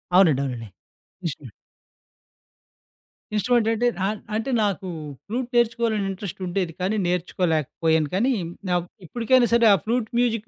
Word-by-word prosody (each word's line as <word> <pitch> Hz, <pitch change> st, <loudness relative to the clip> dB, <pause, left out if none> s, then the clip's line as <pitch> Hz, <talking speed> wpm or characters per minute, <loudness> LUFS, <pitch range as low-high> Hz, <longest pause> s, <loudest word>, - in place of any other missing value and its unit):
అవునండి. 160 Hz, -8 st, +5 dB
అవునండి. 120 Hz, -4 st, -4 dB, 0.6 s
ఇన్సు 145 Hz, -5 st, -5 dB, 1.9 s
ఇన్‌స్ట్రుమెంట్ 235 Hz, +1 st, +2 dB
అంటే 240 Hz, +2 st, +1 dB, 0.2 s
ఆహ్, 210 Hz, +1 st, -1 dB, 0.2 s
అంటే 225 Hz, +5 st, -2 dB
నాకు 195 Hz, -2 st, -1 dB, 0.4 s
ఫ్లూట్ 245 Hz, +3 st, -3 dB
నేర్చుకోవాలని 230 Hz, -3 st, +2 dB
ఇంట్రెస్టుండేది. 185 Hz, -2 st, -3 dB
కానీ, 195 Hz, +4 st, 0 dB
నేర్చుకోలేకపోయాను 160 Hz, -3 st, 0 dB
కానీ, 245 Hz, +7 st, +2 dB, 0.4 s
నాక్ 175 Hz, -1 st, +1 dB, 0.2 s
ఇప్పటికైనా 240 Hz, +5 st, +3 dB
సరే 235 Hz, -1 st, +5 dB
ఆ -, -, +7 dB
ఫ్లూట్ 235 Hz, 0 st, 0 dB
మ్యూజిక్ 230 Hz, -3 st, 0 dB
200 Hz, 115 wpm, -24 LUFS, 175-235 Hz, 1.9 s, ఆ